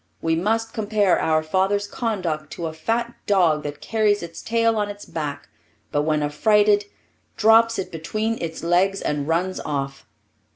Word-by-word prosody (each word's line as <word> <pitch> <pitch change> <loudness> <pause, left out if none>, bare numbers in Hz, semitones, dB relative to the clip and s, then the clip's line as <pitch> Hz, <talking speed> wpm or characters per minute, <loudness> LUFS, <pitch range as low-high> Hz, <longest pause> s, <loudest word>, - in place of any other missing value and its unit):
We 165 0 +1
must 225 +6 0
compare 210 -3 +2
our 155 -1 +2
father's 190 +5 +1
conduct 175 - -3
to 170 - -5
a 160 - -4
fat 230 +9 -2
dog 175 -7 +3
that 145 0 -6
carries 210 -3 +1
its 165 -1 -8
tail 230 0 +1
on 205 -1 0
its 205 0 -8
back, 145 -3 -5 0.4
but 145 - +1
when 150 0 0
affrighted 205 +7 +3 0.5
drops 225 +1 +5
it 190 - -4
between 215 +8 -3
its 165 -1 -5
legs 185 +3 +2
and 145 -1 -1
runs 180 +3 0
off. 135 -2 -4
185 Hz, 160 wpm, -23 LUFS, 155-215 Hz, 0.5 s, drops